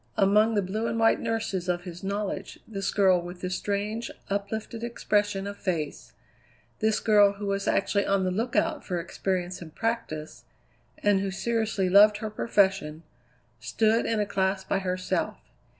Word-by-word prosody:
Among 210 +3 +4
the 205 - +2
blue 215 +5 -2
and 230 0 -2
white 225 0 +4
nurses 220 -6 -2
of 175 0 0
his 180 0 -9
knowledge 200 0 -3
this 195 -3 -3
girl 190 -3 +4
with 175 +1 -9
the 180 - -3
strange, 205 +4 -2 0.2
uplifted 220 +3 -3
expression 205 -4 0
of 200 0 -6
face; 160 -6 -3 0.7
this 220 0 +2
girl 205 -2 +5
who 200 +1 -7
was 200 0 -1
actually 200 +1 +1
on 195 -1 +2
the 185 - 0
lookout 230 +6 0
for 180 -2 -2
experience 180 +1 -3
and 160 -2 -10
practice, 225 -10 -3 0.6
and 205 -1 +4
who 195 0 -1
seriously 220 -1 -1
loved 205 +3 +7
her 215 -1 -5
profession, 190 -8 +1 0.6
stood 220 - +1
in 225 -1 0
a 210 - +1
class 190 -1 0
by 195 - 0
herself. 185 -1 -2
200 Hz, 160 wpm, -27 LUFS, 185-215 Hz, 0.7 s, loved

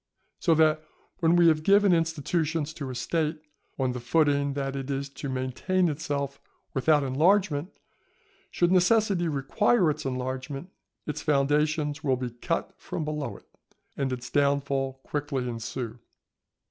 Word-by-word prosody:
So 165 - +3
that 155 0 +3 0.4
when 165 0 +4
we 175 -1 +6
have 155 -1 +2
given 200 +2 +5
institutions 165 -1 0
to 140 -4 -6
a 130 - -5
State 155 +5 -1 0.4
on 130 -2 0
the 125 - -4
footing 140 +2 +2
that 135 -1 -2
it 135 0 -5
is 140 0 -2
to 140 0 -6
maintain 130 +8 0
itself 140 -2 -3 0.3
without 145 +2 +3
enlargement, 160 +4 +2 0.7
should 175 0 +1
necessity 185 -1 +3
require 160 - +2
its 155 +1 -5
enlargement, 130 +5 -4 0.3
its 150 - -4
foundations 150 +1 +1
will 135 -3 +2
be 125 -1 -4
cut 120 - -3
from 155 - -4
below 150 -2 -3
it, - - -19 0.5
and 135 -1 -1
its 125 -1 -5
downfall 140 -2 +1
quickly 140 -3 -2
ensue. 115 0 -5
145 Hz, 140 wpm, -27 LUFS, 135-165 Hz, 0.7 s, we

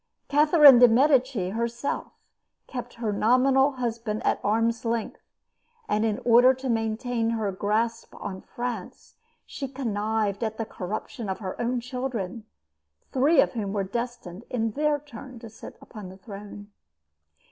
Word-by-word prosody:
Catherine 295 -3 +7
de' 245 - +9
Medici 255 -5 +3
herself 235 +5 -3 0.5
kept 245 -2 -7
her 225 -3 -2
nominal 265 +6 +3
husband 230 -3 -3
at - - +2
arm's 230 +2 +1
length; 230 -1 -2 0.7
and 210 +1 +1
in 220 -2 0
order 245 +2 +6
to 260 0 -5
maintain 225 +1 -1
her 220 -3 -1
grasp 220 +4 -2
on 190 -2 -6
France 240 -6 -7 0.3
she 275 - -6
connived 220 -4 -2
at 220 -1 -3
the 225 - -2
corruption 210 +4 -6
of 190 - -2
her 190 -3 -5
own 240 +1 -1
children, 240 -5 -4 0.7
three 280 +4 +4
of - - +1
whom 205 -4 -3
were 200 -2 0
destined 235 -2 -5
in 225 -2 -1
their 300 +4 +1
turn 265 -3 -11
to 230 0 -10
sit 225 - -11
upon 210 -4 -10
the 190 - -12
throne. 205 0 -10
230 Hz, 145 wpm, -26 LUFS, 210-255 Hz, 0.7 s, de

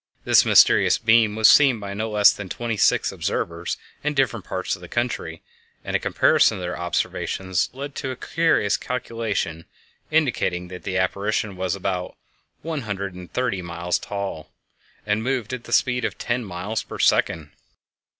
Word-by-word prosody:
This - - +5
mysterious - - +6
beam 110 -2 +3
was 110 -1 +5
seen 135 -6 +6
by 100 -1 -6
no 110 +2 -3
less 105 -1 +5
than 100 -2 -8
twenty 115 +3 -3
six 105 - +2
observers 85 0 -3 0.3
in 150 0 -1
different 120 -7 0
parts 95 0 -2
of 90 - -15
the 90 - -9
country, 115 -8 -3 0.4
and - - -2
a - - +3
comparison - - +3
of - - -7
their 90 0 -3
observations 90 +1 -2
led 140 +2 -7
to 135 - -3
a 130 - -4
curious 160 -8 +1
calculation 110 -9 -3 0.4
indicating 120 - 0
that 90 0 -8
the 95 - -1
apparition 100 +2 -1
was 95 +1 -2
about 95 -2 -3 0.5
one 160 -2 -3
hundred 100 -3 -4
and 90 -1 -11
thirty 125 -6 -1
three - - -5
miles 85 0 -2
tall 100 -6 -5 0.6
and 105 +1 0
moved 125 -1 -2
at 125 -2 -6
the - - -11
speed 125 -1 +2
of - - -2
ten 120 +1 -2
miles 100 +3 -4
per - - -9
second! 80 -3 +1
105 Hz, 170 wpm, -23 LUFS, 90-120 Hz, 0.6 s, mysterious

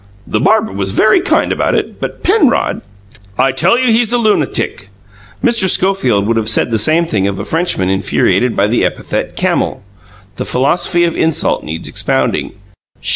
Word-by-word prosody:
The 105 - -2
barber 215 - +2
was 95 -1 -2
very 215 - +3
kind 390 - +1
about - - 0
it, - - -3
but - - -6
Penrod 370 - +1 0.3
" 100 -1 -22
"I - - +1
tell 170 - +2
you 250 -2 +2
he's 230 0 +1
a 245 - +2
lunatic!" 220 -3 -1 0.6
Mr. 230 -6 +2
Schofield 175 - +1
would 115 +1 0
have 110 -1 +1
said 115 - +3
the 110 - +1
same 160 +8 +3
thing 100 -11 -1
of 100 -1 -3
a - - -5
Frenchman 165 - -1
infuriated 100 +5 0
by 100 - +2
the 115 +3 0
epithet - - -3
"camel." - - -1 0.5
The - - -4
philosophy 175 +6 +1
of 170 -1 0
insult 160 -1 0
needs 80 +1 -6
expounding. - - -1
160 Hz, 175 wpm, -14 LUFS, -, 0.6 s, very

